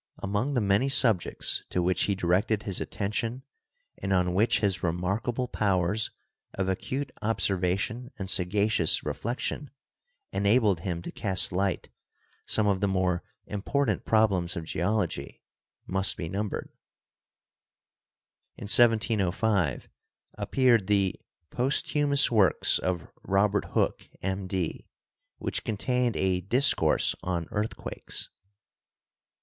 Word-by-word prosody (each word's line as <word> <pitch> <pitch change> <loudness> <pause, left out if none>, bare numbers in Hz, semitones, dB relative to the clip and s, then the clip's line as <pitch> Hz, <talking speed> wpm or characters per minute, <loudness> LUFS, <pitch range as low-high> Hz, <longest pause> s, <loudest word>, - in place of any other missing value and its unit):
Among 105 +9 -2
the 120 - +2
many 100 +6 +2
subjects 115 -9 +3
to 90 - 0
which 90 0 +1
he 100 - 0
directed 95 +4 +1
his 100 -3 -3
attention 115 +5 -3 0.6
and 95 - -3
on 90 -1 +2
which 110 +5 +2
his 95 -3 +1
remarkable 100 +9 -1
powers 100 -1 0 0.5
of 95 -1 -1
acute 130 +8 -3
observation 100 +3 0
and 95 -3 -5
sagacious 95 0 +2
reflection 125 +4 -3 0.6
enabled 100 -2 +2
him 85 -1 -4
to - - -6
cast 95 -3 +1
light 95 +1 -1 0.6
some 110 - +1
of 100 -2 +1
the 100 - +2
more 95 -2 0 0.2
important 110 +2 -1
problems 100 -6 +2
of 85 - -4
Geology 85 -4 -2 0.5
must 95 +1 0
be 80 - -4
numbered. 100 +4 -4 1.9
In - - -9
1705 105 - +2 0.5
appeared 115 0 +2
the 100 -2 +1 0.3
"Posthumous 140 +2 +2
Works 100 -8 +3
of 90 -2 -2
Robert 100 +1 +1
Hooke, - - 0
M.D.," 95 -2 -3 0.5
which - - -4
contained 120 +2 -1
a 95 -1 +1
"Dis 125 +9 +5
course - - +2
on 85 -2 -2
Earthquakes." 105 +1 -3
100 Hz, 110 wpm, -27 LUFS, 90-115 Hz, 1.9 s, Dis